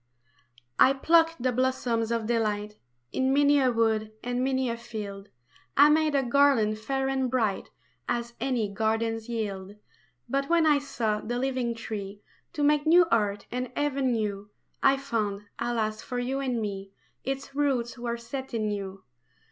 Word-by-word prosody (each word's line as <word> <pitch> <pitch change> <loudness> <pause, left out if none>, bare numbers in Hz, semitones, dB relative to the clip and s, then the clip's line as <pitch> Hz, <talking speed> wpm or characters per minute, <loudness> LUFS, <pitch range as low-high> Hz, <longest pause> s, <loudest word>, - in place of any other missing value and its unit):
I 265 - +7
PLUCKED 325 +1 +3
the 255 - +2
blossoms 240 -2 0
of 230 -1 0
delight 210 -2 -1 0.4
In 260 0 +1
many 285 +1 +4
a 260 -2 +3
wood 220 -2 +1
and 245 +1 -1
many 260 -1 +1
a 235 - -1
field, 210 -4 -7 0.5
I 290 +2 +8
made 310 -1 +3
a 275 - +3
garland 240 -5 +3
fair 270 +4 -1
and 265 -1 0
bright 225 -6 0 0.4
As 235 0 -2
any 245 -5 0
gardens 225 +2 -1
yield. 205 -4 -4 0.5
But 275 +1 -1
when 335 -1 +4
I 295 -2 +5
sought 225 -7 -2
the 240 +1 -1
living 255 -2 -1
tree 205 -3 -6 0.3
To 295 - -2
make 295 +1 +3
new 345 +2 +7
earth 205 -3 +1
and 250 0 -3
Heaven 275 -3 0
new, 205 -2 -3 0.3
I 275 0 +5
found 215 -7 -2 0.2
alas 220 -2 -1
for 250 - -5
you 255 +2 -1
and 255 -4 -1
me 195 -2 -5 0.3
Its 270 +1 -4
roots 265 -5 0
were 235 -1 -3
set 265 +2 -6
in 215 -2 0
you. 195 -1 -5
240 Hz, 160 wpm, -27 LUFS, 215-270 Hz, 0.5 s, I